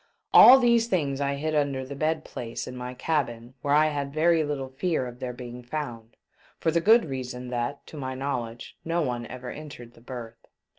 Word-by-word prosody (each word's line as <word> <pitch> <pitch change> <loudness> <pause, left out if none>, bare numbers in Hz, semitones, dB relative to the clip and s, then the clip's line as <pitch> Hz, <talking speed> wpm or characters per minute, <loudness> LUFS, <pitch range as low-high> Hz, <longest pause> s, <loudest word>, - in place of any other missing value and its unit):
All 260 - +11
these 235 -2 +3
things 145 -9 0
I 140 0 0
hid 155 +2 -2
under 140 -3 0
the 140 +2 -7
bed 155 +2 -1
place 115 -1 -6
in 125 - -8
my 125 0 -6
cabin, 125 -5 -2
where 145 0 +2
I 155 +1 +5
had 140 -2 -3
very 160 +2 +3
little 140 -3 -3
fear 145 +1 -1
of 125 0 -9
their 125 - -3
being 125 0 -8
found; 120 -4 -6 0.4
for 160 - +1
the 170 +1 +2
good 225 +6 +6
reason 125 -3 -5
that, 120 +3 -3
to 155 - -11
my 130 -2 -4
knowledge, 120 -4 -4
no 170 +1 0
one 120 -3 -3
ever 125 0 -7
entered 140 -6 -10
the - - -19
berth. 115 -2 -9
135 Hz, 200 wpm, -26 LUFS, 125-155 Hz, 0.4 s, All